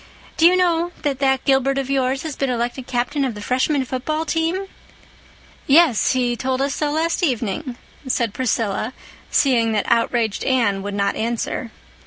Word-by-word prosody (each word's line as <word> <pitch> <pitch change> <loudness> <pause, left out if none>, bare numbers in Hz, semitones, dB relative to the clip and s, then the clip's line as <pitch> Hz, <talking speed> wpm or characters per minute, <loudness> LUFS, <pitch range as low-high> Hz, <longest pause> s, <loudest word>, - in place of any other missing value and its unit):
Do 330 - +6
you 360 - +4
know 345 -1 +1
that 280 -3 -1
that 265 -1 +1
Gilbert 270 0 +2
of 270 -2 -1
yours 265 -1 0
has 310 -4 -5
been 275 - -1
elected 245 +1 -2
Captain 255 +4 -1
of 255 -5 -2
the - - -7
Freshman 260 +5 0
football 305 +6 -2
team?" 330 +4 -1 1.0
"Yes, 285 -5 +4
he 245 -2 0
told 260 +1 -2
us 275 0 0
so 300 +2 -1
last 325 +4 0
evening," 250 - -1 0.3
said 235 -4 0
Priscilla, 225 -2 -1 0.4
seeing 235 -5 +2
that 210 - 0
outraged 230 -2 +1
Anne 230 -7 +1
would 200 0 -5
not 200 0 0
answer. 235 +1 -3
260 Hz, 165 wpm, -21 LUFS, 235-290 Hz, 1.0 s, Do